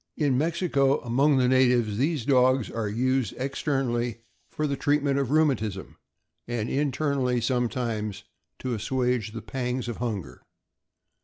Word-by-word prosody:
In 145 -4 +2
Mexico, 150 -2 +1
among 135 +4 +2
the 125 -1 +3
natives, 125 -4 +3
these 145 -3 0
dogs 130 -2 +3
are 115 -2 -2
used 130 +3 0
externally 125 -4 -1 0.3
for 155 -1 -2
the 140 -1 0
treatment 145 -1 +1
of 135 -3 -1
rheumatism, 125 -11 0 0.5
and 120 -2 -2
internally, 135 -3 0
sometimes, 115 -4 -2 0.3
to 130 -1 -3
assuage 125 0 -1
the 115 +1 -7
pangs 125 -1 -3
of 120 - -4
hunger. 110 - -4
125 Hz, 130 wpm, -26 LUFS, 115-140 Hz, 0.5 s, the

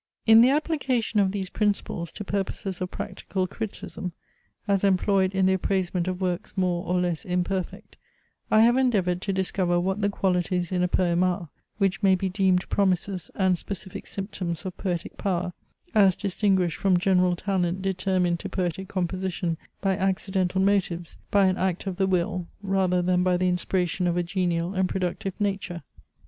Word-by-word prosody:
In 225 0 +8
the 245 - +6
application 270 -7 0
of 195 -2 +3
these 195 -2 -4
principles 200 -5 -1
to 205 - -6
purposes 195 -1 -3
of 180 - -2
practical 185 0 -3
criticism, 190 -3 -6 0.5
as 200 -1 +2
employed 195 0 +2
in 190 -1 +3
the 190 - +4
appraisement 185 -1 0
of 185 -1 -2
works 180 0 -2
more 180 -2 +1
or 180 0 +1
less 175 -3 -1
imperfect, 180 +1 -3 0.5
I 215 - +5
have 240 +2 +5
endeavoured 195 -9 +2
to 200 - -2
discover 185 -2 +1
what 190 +3 -1
the 200 - +2
qualities 180 -2 0
in 180 -1 +1
a 180 - +3
poem 175 -1 +1
are, 180 -2 -1 0.3
which 195 -1 +1
may 195 -2 +5
be 190 +1 -1
deemed 185 -1 +2
promises 190 -2 0
and 185 -3 +2
specific 190 -2 -6
symptoms 190 -3 -4
of 185 - -5
poetic 175 -3 -3
power, 180 -3 -1 0.4
as 195 -4 +5
distinguished 190 -3 +1
from 190 -2 +3
general 180 -1 +3
talent 185 -1 -1
determined 185 -2 0
to - - -6
poetic 185 +1 -2
composition 185 -2 -2 0.3
by 195 -1 +1
accidental 190 0 0
motives, 185 -4 0
by 200 -1 +4
an 185 0 +2
act 185 0 -1
of 190 -2 -3
the 190 - +2
will, 180 -1 0 0.2
rather 190 -2 +1
than 180 0 +2
by 180 0 +2
the 185 +1 +1
inspiration 180 0 0
of 175 0 0
a 175 - +1
genial 175 -1 -1
and 190 -1 +1
productive 190 +2 -3
nature. 195 -4 -2
185 Hz, 170 wpm, -26 LUFS, 180-195 Hz, 0.5 s, In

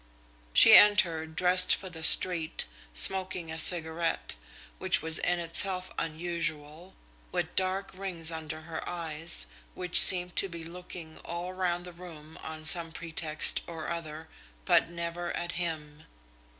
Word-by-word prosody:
She - - +6
entered 165 -6 +2
dressed 180 +1 +4
for 190 - -12
the 170 -3 -10
street, 165 0 +6 0.3
smoking 185 - 0
a 160 - -4
cigarette, 165 -1 +2 0.5
which - - 0
was 160 0 +2
in 175 - -3
itself 180 +2 0
unusual, 160 0 -6 0.4
with - - -6
dark 190 +1 -5
rings 180 -4 -3
under 160 -1 -10
her 160 0 -10
eyes, 165 -1 -5 0.3
which 180 -1 +6
seemed 180 -1 +4
to 195 - +1
be 170 -1 -11
looking 170 -1 -13
all 175 +1 -9
around 180 -1 -5
the 180 -1 -12
room 160 -3 -16
on 155 0 -12
some 165 0 +2
pretext 160 -1 +1
or 165 -2 -10
other, 160 -1 -10 0.4
but - - 0
never 170 0 -8
at 175 -1 -8
him. 155 -3 -8
170 Hz, 135 wpm, -25 LUFS, 160-180 Hz, 0.5 s, She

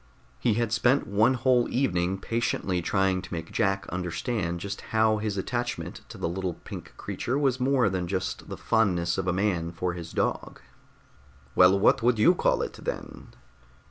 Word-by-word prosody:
He 105 - +2
had 115 -1 0
spent 125 +4 +3
one 110 +6 +3
whole 125 0 +2
evening 95 -8 0
patiently 95 -4 -1
trying 95 +1 +1
to 95 - -11
make 80 -1 -5
Jack 95 0 0
understand 90 0 -2
just 100 +3 -5
how 110 -1 +3
his 105 -2 -2
attachment 120 +5 -3
to - - -9
the - - -2
little 90 0 -3
pink - - -10
creature 125 +3 -3
was 135 -3 +1
more 130 -2 +3
than 95 -2 -1
just 95 +1 -3
the - - -6
fondness 95 -7 +1
of 95 - -2
a - - +3
man 90 -3 0
for 90 +1 -2
his 85 -1 -7
dog. - - -2 0.9
"Well, 90 +5 +6
what 100 - +4
would 120 0 +3
you 110 +12 +6
call - - +1
it, - - -5
then?" - - -6
100 Hz, 175 wpm, -27 LUFS, 90-120 Hz, 0.9 s, Well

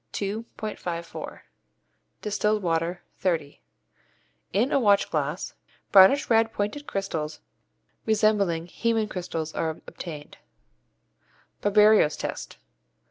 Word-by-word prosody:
54; 200 -5 -5 0.8
distilled 210 0 0
water, 170 +1 -1 0.2
30) 165 -6 -1 0.9
in 225 +8 +1
a - - +3
watch 205 -5 +3
glass, 150 +3 -2 0.4
brownish 200 +9 +7
red 225 -1 +3
pointed 220 +9 -3
crystals 160 -6 -3 0.7
resembling 205 -6 +2
hæmin 225 +4 0
crystals 165 -5 -4
are 160 -1 -2
obtained. 150 -4 -9 1.2
_Barberio's 210 -6 +5
Test. - - -5
195 Hz, 85 wpm, -26 LUFS, 165-215 Hz, 1.2 s, brownish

